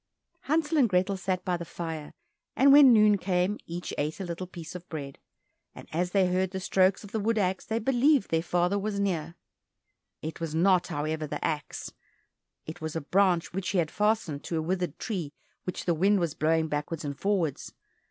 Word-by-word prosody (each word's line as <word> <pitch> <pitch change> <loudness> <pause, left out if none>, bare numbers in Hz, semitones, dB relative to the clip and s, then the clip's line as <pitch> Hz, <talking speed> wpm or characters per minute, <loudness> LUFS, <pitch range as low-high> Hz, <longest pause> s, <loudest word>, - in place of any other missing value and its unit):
Hansel 310 +1 +1
and 245 -5 +4
Grethel 185 +1 +1
sat 185 -1 -2
by 180 -1 0
the 170 - -6
fire, 160 0 -6 0.4
and 275 +1 +6
when 280 -3 +9
noon 210 -3 +5
came, 185 +2 0
each 175 +1 -5
ate 150 +4 -2
a - - -3
little 175 +1 -5
piece 170 -3 -9
of 180 0 -9
bread, 140 -4 -6 0.6
and - - -11
as 175 +2 0
they 190 0 +3
heard 185 +1 +1
the 190 0 -4
strokes 190 +1 +2
of 205 - -11
the 220 - -1
wood 225 +2 0
axe 190 -2 0
they 225 - -1
believed 270 +4 +3
that - - -24
their 165 0 +2
father 180 +3 +1
was 200 0 -2
near. 170 -5 -1 0.9
It 160 0 -5
was 165 -2 -4
not, 180 +1 +3
however, 155 +1 -2
the - - -4
axe, 150 -3 -4 0.7
it 160 +2 -8
was 160 0 -4
a 165 - -1
branch 180 +2 +2
which 195 0 -2
he 195 - 0
had 160 -3 +1
fastened 210 -9 0
to 165 - -2
a - - 0
withered 180 -2 -2
tree 175 - -4 0.3
which 180 - -4
the 175 - +2
wind 195 +5 +3
was 170 -4 -1
blowing 160 +1 +1
backwards 150 +1 -3
and 140 -1 -3
forwards. 180 -5 -1
180 Hz, 200 wpm, -28 LUFS, 160-200 Hz, 0.9 s, when